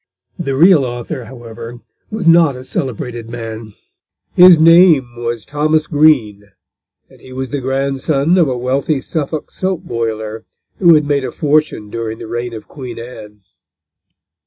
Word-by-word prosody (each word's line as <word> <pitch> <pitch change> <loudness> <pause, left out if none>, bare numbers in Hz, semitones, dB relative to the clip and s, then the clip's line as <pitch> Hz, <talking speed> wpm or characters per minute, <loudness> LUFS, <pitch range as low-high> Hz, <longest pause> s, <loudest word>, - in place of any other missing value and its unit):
The 140 -6 -2
real 165 0 +5
author, 120 +1 -5
however, 120 -1 -10 0.3
was 215 -4 -5
not 165 -4 +5
a 125 - -9
celebrated 120 -3 -5
man. 115 -2 -8 0.6
His 180 -1 +8
name 160 -6 +5
was 120 -2 -4
Thomas 155 +2 0
Green, 140 - +2 0.6
and - - -21
he 130 - -14
was 130 -1 -5
the 145 - -3
grandson 135 +4 0
of 165 - +3
a 125 - -2
wealthy 135 +4 -1
Suffolk 155 +1 -4
soap 185 -2 -3
boiler, 110 - -4 0.4
who 170 -3 +6
had 150 -1 +2
made 145 -1 0
a - - -4
fortune 150 -8 -1
during 115 -1 -4
the 115 - -9
reign 120 +2 -4
of 110 - -10
Queen 130 -4 -9
Anne. 110 -3 -11
130 Hz, 150 wpm, -16 LUFS, 115-155 Hz, 0.6 s, His